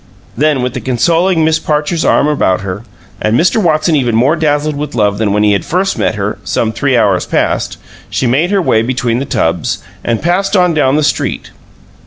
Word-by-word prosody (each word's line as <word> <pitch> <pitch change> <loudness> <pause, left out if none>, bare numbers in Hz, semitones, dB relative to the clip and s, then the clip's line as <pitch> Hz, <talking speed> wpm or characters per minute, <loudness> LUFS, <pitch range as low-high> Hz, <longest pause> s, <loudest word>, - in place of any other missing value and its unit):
Then 145 -1 +1
with 125 -1 -2
the 125 - -5
consoling 165 +7 +1
Miss 160 0 +2
Parcher's 150 +2 -1
arm - - +3
about 115 -12 +1
her, 100 +2 -5 0.4
and 110 +2 +1
Mr. 185 +6 +2
Watson 155 -2 +2
even 125 -5 +1
more 130 +8 +3
dazzled 150 -1 0
with 145 -1 -5
love 105 -2 +1
than 110 -2 0
when 105 +1 +1
he 105 -1 +3
had 100 - -1
first 190 +3 -1
met - - -1
her, 105 +1 -3
some 110 - -1
three 130 +3 0
hours 100 -5 +1
past, - - -1 0.3
she - - -1
made 140 +9 +1
her 200 -2 +1
way 110 - +2
between 120 0 -1
the 135 - -3
tubs, 80 - -1 0.3
and 115 -1 -1
passed 190 +4 +1
on 180 -2 +3
down 145 -3 +2
the 155 - +1
street. 145 -3 -2
140 Hz, 205 wpm, -13 LUFS, 115-160 Hz, 0.4 s, arm